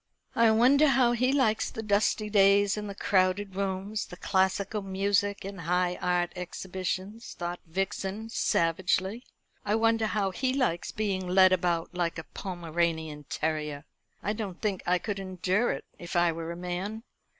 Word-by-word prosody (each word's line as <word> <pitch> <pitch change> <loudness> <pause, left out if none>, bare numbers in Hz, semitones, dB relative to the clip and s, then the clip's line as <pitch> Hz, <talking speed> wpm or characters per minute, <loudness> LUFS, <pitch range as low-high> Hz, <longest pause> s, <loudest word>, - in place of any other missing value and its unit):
"I 230 0 +5
wonder 255 +7 +5
how 255 -3 +4
he 250 +2 +2
likes 260 -6 +2
the 220 - -6
dusty 210 +1 +1
days, 200 -1 +4
and 210 -1 -5
the 200 - -6
crowded 190 0 +1
rooms, 195 +2 -2
the 180 - -10
classical 190 +3 0
music, 200 +1 0
and 195 -2 -6
high 180 +1 0
art 180 -1 +1
exhibitions?" 185 +4 -5
thought 175 0 -4
Vixen 195 +4 -3
savagely. 190 +4 0 0.4
"I 210 +1 +1
wonder 225 0 +2
how 200 -3 0
he 255 +7 -1
likes 210 -11 0
being 195 -4 -2
led 185 +1 +6
about 175 -2 0
like 175 -2 -1
a 165 - -5
Pomeranian 165 -5 -3
terrier? 150 -1 -3 0.4
I 210 - 0
don't 205 -5 -5
think 205 -4 -1
I 180 +1 +4
could 200 +2 -4
endure 190 +4 0
it - - -5
if 175 - -7
I 175 -1 +4
were 165 0 -5
a 170 - -6
man. 180 +5 -4
190 Hz, 160 wpm, -28 LUFS, 175-210 Hz, 0.4 s, led